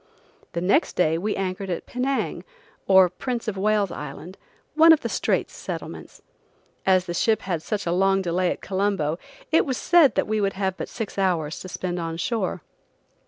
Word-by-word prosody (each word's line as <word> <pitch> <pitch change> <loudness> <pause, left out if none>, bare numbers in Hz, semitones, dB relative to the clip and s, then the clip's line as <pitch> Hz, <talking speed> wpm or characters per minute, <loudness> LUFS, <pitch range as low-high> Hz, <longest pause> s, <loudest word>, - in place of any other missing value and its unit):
The 170 - -2
next 200 - +2
day 165 -2 +2
we 210 +4 -1
anchored 195 0 -3
at 175 - -3
Penang, 260 +2 -2 0.4
or 190 -1 +7
Prince 235 +7 -4
of 215 - -2
Wales 205 -1 +1
Island, 150 +5 -8 0.4
one 320 +2 +7
of 310 - +1
the - - -3
Straits - - -1
Settlements. - - -7 0.6
As 185 -1 +4
the 175 - -4
ship 220 +5 +1
had 175 -4 -2
such 205 +4 -3
a 170 - 0
long 195 +2 +2
delay 180 +1 +1
at - - -4
Colombo, 190 -5 -1 0.3
it 320 - +5
was 260 -4 -2
said 335 -5 +5
that - - +2
we 215 0 0
would 195 -1 +1
have 190 -1 -1
but - - -6
six 220 -3 -5
hours 165 -5 0
to 185 - -8
spend 180 -1 -3
on 165 -1 -4
shore. 185 -2 -2
190 Hz, 185 wpm, -24 LUFS, 175-215 Hz, 0.6 s, or